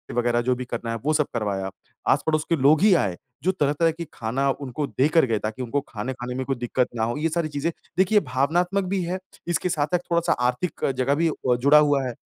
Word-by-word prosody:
वगैरह 120 0 +2
जो 125 +1 +1
भी 125 0 -5
करना 115 -1 -4
है 115 - -2
वो 155 - +2
सब 150 -1 +2
करवाया, 100 -4 -2 0.4
आस-पड़ोस 155 -1 +2
के 165 - +4
लोग 145 +4 +4
ही 205 -2 +6
आए, 95 - +1 0.3
जो 185 - +3
तरह-तरह 160 -1 +1
के 170 +1 -7
खाना 130 +5 -1
उनको 140 +1 -3
देकर 150 +2 +3
गए 110 -3 0
ताकि 110 +5 -4
उनको 140 +4 -1
खाने 115 +5 -4
खाने 125 0 -6
में 130 0 -3
कोई 135 - -1
दिक्कत 120 +1 0
ना 110 - 0
हो 120 +5 -1
ये 165 +2 0
सारी 165 0 -1
चीज़ें 145 +3 -2 0.3
देखिए 195 +3 +4
भावनात्मक 175 +8 0
भी 185 0 -1
है, 180 +2 -3 0.3
इसके 175 +1 0
साथ-साथ 155 +3 0
थोड़ा-सा 170 0 +3
आर्थिक 125 +8 -2
जगह 135 +2 +2
भी 165 +1 +2 0.3
जुड़ा 140 +4 +6
हुआ 145 -2 +3
है, 120 - -4
140 Hz, 220 wpm, -24 LUFS, 125-165 Hz, 0.4 s, ही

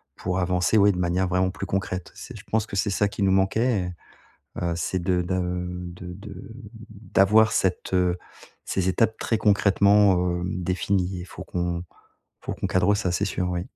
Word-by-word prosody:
pour 90 +1 -2
avancer, 90 +3 +2
ouais, 100 0 +6
de - - -5
manière 90 +1 0
vraiment 95 +1 +1
plus - - -6
concrète. 95 -2 -3
C'est - - -9
je - - -12
pense 110 -1 +1
que 100 - -8
c'est 100 - +1
ça 105 +1 +2
qui 100 - -3
nous 95 - +3
manquait 95 0 +1 0.5
et - - -11
heu, 85 -1 0
c'est 90 +2 -2
de 90 -1 +1
d'a 95 +1 -1
heu, 90 0 -3 0.3
de 90 0 -9
de, 100 +3 -10
hem, 100 +4 -10 0.6
d'avoir 110 +3 +5
cette, 95 -2 0
heu, 90 -1 +2 0.5
ces 95 -1 -1
étapes, 110 +3 +1
très 115 - 0
concrètement, 100 -1 +4 0.2
heu, - - -3
définies 90 +1 -1
et - - -8
faut 95 0 -9
qu'on 85 -1 -3 0.6
faut - - -4
qu'on - - -3
cadre 95 +2 +2
ça, 95 -4 -1
c'est 100 - 0
sûr, 90 -2 -2
oui. 90 -1 -2
95 Hz, 195 wpm, -25 LUFS, 90-100 Hz, 0.6 s, ouais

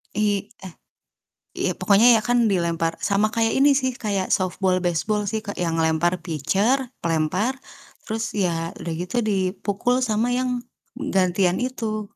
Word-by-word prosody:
I 205 0 0
eh, 180 - -9 0.8
iya - - 0
pokoknya 225 +3 +5
ya - - -1
kan 240 -2 +3
dilempar 165 -3 0
sama 205 +2 +1
kayak 225 -1 +1
ini 285 +2 +5
sih 260 -2 -1
kayak 200 -6 -2
softball, 185 -1 0
baseball 180 +5 0
sih, 220 - -1
Kak, 205 - -4
yang 165 -2 -1
lempar 160 +2 +1
pitcher, 205 - 0
pelempar 170 +9 0 0.5
terus 225 +1 -3
ya 165 -3 0
udah 170 - -5
gitu 180 +7 -4
dipukul 200 +4 0
sama 225 0 +1
yang 255 0 0 0.5
m - - -4
gantian 185 -1 +2
itu. 225 -4 -3
200 Hz, 150 wpm, -23 LUFS, 175-225 Hz, 0.8 s, pokoknya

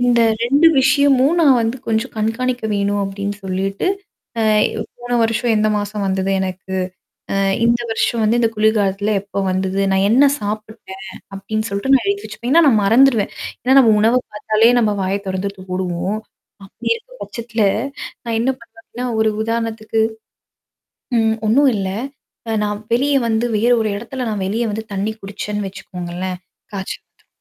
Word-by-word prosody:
இந்த 245 -1 +3 0.2
2 280 +7 +4
விஷயமும் 280 +2 +4
நான் 275 -6 +5
வந்து 230 +3 -1
கொஞ்சம் 225 +3 -1
கண்காணிக்க 230 +3 -1
வேணும் 200 0 0
அப்படின்னு 200 +1 -4
சொல்லிட்டு. 195 - -2 0.5
அ - - +2 0.6
போன 245 0 -6
வருஷம் 230 +1 +1
எந்த 215 0 +2
மாசம் 205 0 -3
வந்தது 190 0 0
எனக்கு? 190 0 -4 0.6
அ - - 0 0.3
இந்த 235 +1 +3
வருஷம் 225 +1 0
வந்து 220 +2 +2
இந்த 230 - +3
குளிர்காலத்தில 210 -1 +1
எப்ப 200 0 -4
வந்தது? 190 +1 -1
நான் 190 +1 +3
என்ன 255 +5 +6 0.2
சாப்பிட்டேன் 210 -2 -6 0.3
அப்படின்னு 215 +3 -3
சொல்லிட்டு 200 +7 -1
நான் 265 - +3
எழுத்தி 400 +1 -1
வச்சுப்பேன். 245 +3 -4
ஏன்னா 335 +2 +6
நான் 220 -5 +4
மறந்துருவேன். 230 0 +4 0.3
ஏன்னா 260 +1 +3
நம்ம 230 -4 +5
உணவ 230 +4 +4
பார்த்தாலே 215 +2 +3
நம்ம 215 -3 +1
வாய 190 +1 0
தொறந்து 190 +1 -2 0.2
மூடுவோம். 185 +2 -2 0.5
அப்படி 195 - -6
இருக்க 470 +2 -12
பட்சத்தல, 235 -2 -3 0.6
நான் 230 -1 -2
என்ன 250 +3 +2
பண்ணுவன்னா. 230 +2 -8
ஒரு 220 - +3
உதாரணத்துக்கு. 225 -1 -2 1.2
ம். 220 -1 +2
ஒண்ணும் 275 +5 +5
இல்ல. 195 -2 -2 0.6
அ - - 0
நான் 210 0 -2
வெளிய 280 +4 +2
வந்து 225 +1 +1
வேற 235 +4 +2
ஒரு 215 - 0
இடத்துல 250 +3 -5
நான் 205 -2 -2
வெளிய 225 +4 -1
வந்து 220 +2 -4
தண்ணி 200 +3 -1
குடிச்சேன்னு 205 +1 -4
வச்சுக்கோங்களேன். 180 -1 -6 0.3
காச்ச 190 -1 -4
வந்துறும். - - -38
220 Hz, 155 wpm, -19 LUFS, 200-240 Hz, 1.2 s, என்ன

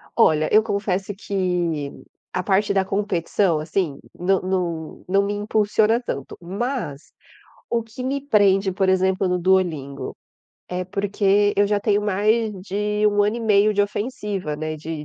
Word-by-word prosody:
Olha, 155 -9 +4
eu 215 +1 +6
confesso 200 -2 -2
que 180 -7 -1 0.4
a 185 - -1
parte 200 +2 +2
da 195 -1 +2
competição, 190 -3 0
assim, 155 -1 -2 0.2
não 190 +2 +1
não 175 -4 -3
não 195 +2 +3
me 205 - -1
impulsiona 210 +2 +2
tanto, 140 - -5
mas 190 - -4 0.6
o 230 -1 0
que 225 +3 -9
me 275 +2 -2
prende 195 -5 +3
por 190 0 +1
exemplo 190 0 +2
no 180 0 +1
duolingo? 170 -7 0 0.5
É 180 0 -3
porque 200 +1 +1
eu 205 0 +3
já 205 0 +1
tenho 205 0 +1
mais 215 +2 +1
de 210 +2 -1
1 205 0 +2
ano 205 +2 +1
e - - -4
meio 215 -2 +4
de 205 -1 +3
ofensiva, 205 - -3
né, 155 +1 -4
de 155 0 -6
195 Hz, 155 wpm, -22 LUFS, 180-210 Hz, 0.6 s, eu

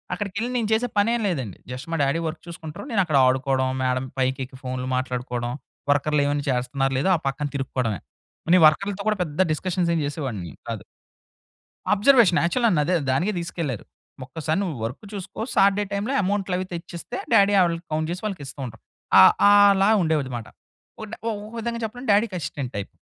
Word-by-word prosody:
అక్కడికెళ్ళి 205 +4 -3
నేను 225 -3 0
చేసే 240 +3 +1
పనేమి 230 +3 +2
లేదండి. 130 - -3
జస్ట్ 130 +4 -7
మా - - +1
డ్యాడీ 140 +4 +1
వర్క్ 155 - -6
చూసుకుంటారు. 165 - -8
నేనక్కడ 175 -9 +2
ఆడుకోవడం, 130 0 +1
మేడం 130 0 0
పైకెక్కి 130 0 -2
ఫోన్‌లు 130 0 -4
మాట్లాడుకోవడం, 125 -1 -3 0.4
వర్కర్‌లు 145 +1 +2
ఏమైనా 145 0 -1
చేస్తున్నారో 130 +2 -1
లేదో 190 - +2
ఆ - - -10
పక్కన 140 +2 -2
తిరుక్కోవడమే. 125 - -2 0.5
నేను 180 -3 +6
వర్కర్‌లతో 200 +5 0
కూడా 210 - 0
పెద్ద 160 +2 -2
డిస్కషన్స్ 175 +1 -1
ఏమి 155 - 0
చేసేవాడిని 120 - -5 0.2
కాదు. - - -4 1.1
అబ్జర్వేషన్ 210 -4 +5
యాక్చువల్‌గా 190 -3 +2
అదే 180 +1 +1 0.2
దానికే 175 +11 +1
తీసుకెళ్లారు. 165 - -4 0.4
ఒక్కసారి 155 +4 -2
నువ్వు 180 -7 -2
వర్క్ 125 - -5
చూసుకో 200 +2 -6
సాటర్డే 200 +1 +4
టైమ్‌లో 210 +7 -1
అమౌంట్‌లు 195 -1 -1
అవి 185 - -2
తెచ్చిస్తే 170 +7 -6 0.2
డ్యాడీ 200 -2 +5
వాళ్ళకి 170 -1 +1
కౌంట్ 155 +1 -1
చేసి 180 - -4
వాళ్ళకి 190 -8 -4
ఇస్తూ 140 - -10
ఉంటారు. 115 -2 -12 0.4
ఆ! - - +10 0.3
ఆలా 200 -1 +6
ఉండేవాడన్నమాట. 135 -8 -1 0.6
ఒక 225 +1 -5 0.3
విధంగా 235 +1 -3
చెప్పడం 245 +3 -7
డ్యాడీకి 205 -3 +1
అసిస్టెంట్ 140 -3 -5
టైప్. 100 - -4
165 Hz, 160 wpm, -24 LUFS, 130-200 Hz, 1.1 s, ఆ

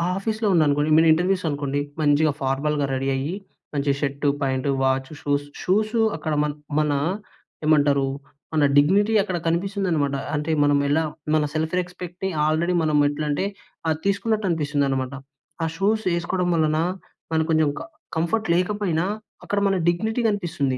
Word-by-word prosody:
ఆఫీస్‌లో 215 +2 -1
ఉన్నాననుకోండి, 150 -2 +3
మీ - - +7
ఇంటర్వ్యూస్ 180 +2 0
అనుకోండి 145 -1 -2 0.2
మంచిగా 150 +1 +3
ఫార్మల్‌గా 140 +2 0
రెడీ 135 +1 -1
అయ్యి 145 +7 -2 0.4
మంచి 140 0 +1
shirt, 140 0 0
pant, 135 0 0
watch, 130 0 +1
shoes, 145 0 0 0.2
shoes 215 +4 +1
అక్కడ 155 -1 -3
మన, 150 - 0 0.3
మన 150 -1 +1 0.7
ఏమంటారు 145 -3 +3 0.5
మన 155 -2 +4
డిగ్నిటీ 200 +9 +4
అక్కడ 185 -3 -2
కనిపిస్తుందనమాట. 170 -5 0 0.2
అంటే 150 +2 -1
మనం 145 0 +4
ఎలా 155 +3 +2 0.3
మన 155 - +3
సెల్ఫ్ 160 +1 -1
రెస్పెక్ట్‌ని 180 +1 -5 0.2
ఆల్రెడీ 165 +3 +1
మనం 155 -1 +2
ఎట్లంటే, 150 +4 -1 0.4
అది 155 0 0
తీసుకున్నట్టు 205 +1 0
అనిపిస్తుందనమాట. 140 -4 0 0.5
ఆ - - +2
షూస్ 215 +5 +1
ఏసుకోవడం 175 +1 -1
వలన 155 -1 +2 0.5
మనకి 160 0 +1
కొంచెం 155 -2 +3
కం - - -7 0.3
కంఫర్ట్ 170 +7 0
లేకపోయినా 180 -2 0 0.4
అక్కడ 205 - -1
మన 195 - +2
డిగ్నిటీ 220 +8 +1
కనిపిస్తుంది. 165 -10 -1
160 Hz, 140 wpm, -23 LUFS, 145-185 Hz, 0.7 s, మీ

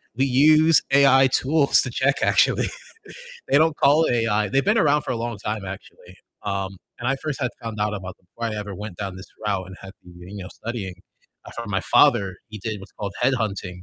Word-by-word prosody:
we 135 +2 +2
use 155 +4 +5
AI 135 -1 +6
tools 140 +1 +3
to 130 - -3
check 135 +3 +1
actually. - - +3 0.8
They - - +4
don't 160 0 +2
call 150 +3 +4
it - - +1
AI. 105 -2 +1
They've 135 +1 +1
been 215 +3 +2
around 150 -4 +3
for - - -6
a 125 - -1
long 115 -1 -4
time, 105 0 -4
actually, 95 0 -11 0.3
um, 95 -1 -3 0.2
and 120 - -5
I 135 - +1
first 150 0 -5
had 125 - 0
found 110 -2 -6
out 105 0 0
about 95 -1 -7
them 90 - -36
before 115 -1 -3
I - - -4
ever 105 -1 -6
went 100 -1 -8
down 95 -1 -5
this 95 - -10 0.2
route 100 -3 -1
and 95 0 -11
had 95 - -10
been, 90 -1 -15 0.2
you 95 - -6
know, - - -8
studying. 105 -5 -6 0.5
I - - -9
found 115 -3 -7
my 95 -1 0
father, 95 0 +3
he 105 -1 -8
did 105 +1 -5
what's 95 - -13
called 100 -2 -6
headhunting, 105 -8 -1
110 Hz, 220 wpm, -23 LUFS, 100-135 Hz, 0.8 s, AI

